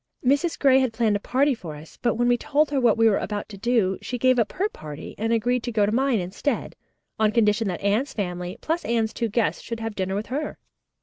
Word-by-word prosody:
"Mrs. 285 +6 +2
Gray 265 -2 +5
had 260 -3 0
planned 225 -2 +2
a - - 0
party 270 +6 +2
for 165 -10 -7
us, 150 +2 -13
but 240 -2 +1
when 240 +1 +1
we 245 - +4
told 300 +3 +1
her 275 -2 +1
what 235 -3 +4
we 225 0 +5
were 210 - +3
about 205 -1 -4
to 210 - -9
do, 215 -4 +1
she 250 - -4
gave 255 +1 +3
up 220 - +1
her 395 - 0
party 150 - -9
and 225 +1 0
agreed 240 +2 +1
to 240 - -4
go 215 -2 +3
to 205 - 0
mine 260 +1 +2
instead, 185 +11 -3 0.4
on 215 -1 +3
condition 215 -1 +2
that 180 -3 -3
Anne's 215 +8 +1
family, 180 -2 -4
plus 330 +2 -1
Anne's 225 -2 0
two 230 - -2
guests, 225 +1 0
should 230 -1 -6
have 225 -1 -4
dinner 190 -1 -2
with 205 +2 -2
her." 295 +2 -3
230 Hz, 245 wpm, -24 LUFS, 205-255 Hz, 0.4 s, Gray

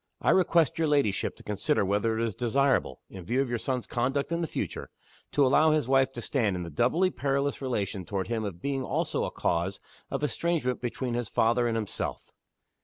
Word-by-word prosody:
"I - - +3
request 170 -4 +3
your 160 - +2
ladyship 140 -10 +1
to - - -15
consider 100 -1 0
whether 105 +3 +1
it 115 - +1
is 110 - -2
desirable 125 - +1
in 95 -2 -10
view 120 +9 0
of 135 -2 +1
your 120 -1 -1
son's 125 -1 -2
conduct 135 +5 -1
in 170 0 0
the 165 - -1
future - - -4 0.4
to 145 - +4
allow 155 +4 +5
his 155 -5 +2
wife 135 0 +3
to 120 - -6
stand 110 -9 0
in 90 - -3
the 85 - -7
doubly 160 - +2
perilous 140 -1 -1
relation 105 -7 -2
toward 95 0 -3
him 115 0 -1
of 95 -4 -6
being 135 -1 -1
also - - -1
a - - -2
cause 85 +3 -1 0.3
of - - -3
estrangement 150 -4 0
between 125 0 -3
his 120 -2 -2
father 120 +2 +2
and 115 -1 0
himself." 110 -3 -4
125 Hz, 205 wpm, -28 LUFS, 105-140 Hz, 0.4 s, allow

